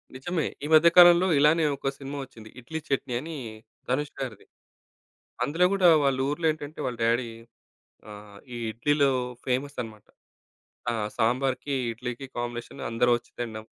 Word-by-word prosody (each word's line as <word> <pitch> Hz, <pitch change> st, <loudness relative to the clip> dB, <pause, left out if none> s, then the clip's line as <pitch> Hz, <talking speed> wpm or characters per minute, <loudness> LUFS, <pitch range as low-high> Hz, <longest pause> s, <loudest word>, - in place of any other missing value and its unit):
నిజమే. 160 Hz, +4 st, -2 dB, 0.2 s
ఈ -, -, -2 dB
మధ్య 155 Hz, +2 st, +8 dB
కాలంలో 175 Hz, +1 st, +8 dB
ఇలానే 155 Hz, +3 st, +4 dB
ఒక 135 Hz, 0 st, -2 dB
సినిమా 140 Hz, +1 st, -7 dB
వచ్చింది. 115 Hz, -4 st, -13 dB
'ఇడ్లీ 160 Hz, +6 st, -6 dB
చట్నీ' 135 Hz, -3 st, -1 dB
అని 160 Hz, +2 st, -7 dB, 0.5 s
'ధనుష్' 140 Hz, +3 st, -2 dB
గారిది. 125 Hz, -6 st, -6 dB, 1.0 s
అందులో 165 Hz, +7 st, +2 dB
గూడా 195 Hz, -3 st, +4 dB, 0.2 s
వాళ్ళూర్లో 140 Hz, +4 st, 0 dB
ఏంటంటే 155 Hz, 0 st, -8 dB
వాళ్ళ 125 Hz, -2 st, -3 dB
డ్యాడీ 120 Hz, +1 st, +1 dB, 0.8 s
ఆహ్, 105 Hz, -1 st, -12 dB, 0.2 s
ఈ -, -, -5 dB
ఇడ్లీలో 140 Hz, +5 st, +2 dB, 0.4 s
ఫేమస్ 135 Hz, +3 st, -1 dB
అన్నమాట. 110 Hz, -2 st, -10 dB, 0.8 s
ఆ! -, -, 0 dB, 0.2 s
సాంబార్‌కి, 130 Hz, +4 st, 0 dB, 0.2 s
ఇడ్లీకి 125 Hz, +3 st, -6 dB
కాంబినేషన్ 120 Hz, 0 st, -5 dB
అందరూ 120 Hz, +2 st, +2 dB
వచ్చి 120 Hz, -, -12 dB
తినడం. 110 Hz, -2 st, -5 dB
135 Hz, 135 wpm, -26 LUFS, 120-150 Hz, 1.0 s, మధ్య